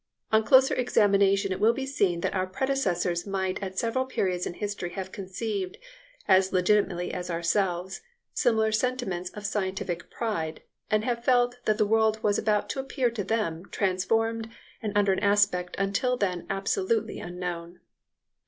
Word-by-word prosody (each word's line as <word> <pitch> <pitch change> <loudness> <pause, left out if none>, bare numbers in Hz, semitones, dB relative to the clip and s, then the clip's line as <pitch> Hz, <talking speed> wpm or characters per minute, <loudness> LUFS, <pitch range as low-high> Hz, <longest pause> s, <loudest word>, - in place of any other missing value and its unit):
On 220 0 +4
closer 265 +2 +5
examination 200 -4 +3
it 185 - -2
will 225 +2 +4
be 265 +2 -3
seen 195 -11 0
that - - -1
our 185 -1 0
predecessors 185 -6 -1
might 190 -1 -2
at 190 -1 -5
several 235 +3 +1
periods 185 -8 -1
in 175 - -6
history 200 -4 -4
have 190 0 -5
conceived, 195 0 -4 0.5
as 190 -1 +4
legitimately 185 -1 +1
as 180 0 -4
ourselves, 175 +2 -1 0.3
similar 220 -4 +2
sentiments 215 -6 -1
of 210 -1 -7
scientific 190 -4 -3
pride, 165 -9 -3 0.3
and 215 0 +1
have 235 -1 -1
felt 245 -1 +2
that 215 -1 +2
the 215 - +3
world 220 +1 +2
was 205 -1 +2
about 210 -1 +1
to - - -4
appear 265 -2 0
to 225 -3 -3
them 195 -4 -2
transformed 225 +4 0 0.3
and 215 -2 -2
under 200 -1 +4
an - - -1
aspect 200 -3 +2
until 200 +6 0
then 185 -5 -2
absolutely 200 +3 -1
unknown. 175 -1 -6
200 Hz, 155 wpm, -27 LUFS, 185-225 Hz, 0.5 s, closer